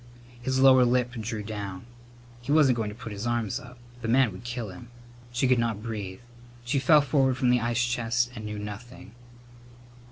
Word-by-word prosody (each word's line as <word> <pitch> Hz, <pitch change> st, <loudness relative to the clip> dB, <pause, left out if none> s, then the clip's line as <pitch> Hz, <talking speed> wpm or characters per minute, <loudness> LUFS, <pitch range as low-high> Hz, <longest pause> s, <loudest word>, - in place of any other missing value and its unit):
His 130 Hz, +1 st, 0 dB
lower 130 Hz, -1 st, +7 dB
lip 125 Hz, 0 st, +2 dB
drew 110 Hz, -2 st, -4 dB
down. 100 Hz, -1 st, -6 dB, 0.6 s
He 120 Hz, -, -4 dB
wasn't 145 Hz, -5 st, +5 dB
going 110 Hz, -3 st, -2 dB
to 105 Hz, -, -8 dB
put 115 Hz, -1 st, -8 dB
his 105 Hz, +3 st, -4 dB
arms 120 Hz, -4 st, -1 dB
up. 125 Hz, 0 st, -13 dB, 0.2 s
The 115 Hz, -, -3 dB
man 125 Hz, 0 st, +4 dB
would 95 Hz, +4 st, -10 dB
kill 120 Hz, -2 st, -4 dB
him. 95 Hz, +6 st, -11 dB, 0.4 s
She 120 Hz, +2 st, +1 dB
could 125 Hz, -1 st, +3 dB
not 115 Hz, -3 st, -1 dB
breathe. 105 Hz, -4 st, -5 dB, 0.4 s
She 135 Hz, +3 st, +1 dB
fell 150 Hz, +3 st, +6 dB
forward 135 Hz, -2 st, +2 dB
from 125 Hz, -2 st, +2 dB
the 125 Hz, -1 st, +3 dB
ice 120 Hz, +1 st, +1 dB
chest 120 Hz, 0 st, 0 dB
and 110 Hz, -3 st, -8 dB
knew 105 Hz, 0 st, -5 dB
nothing. 105 Hz, +2 st, -8 dB
120 Hz, 190 wpm, -27 LUFS, 110-125 Hz, 0.6 s, lower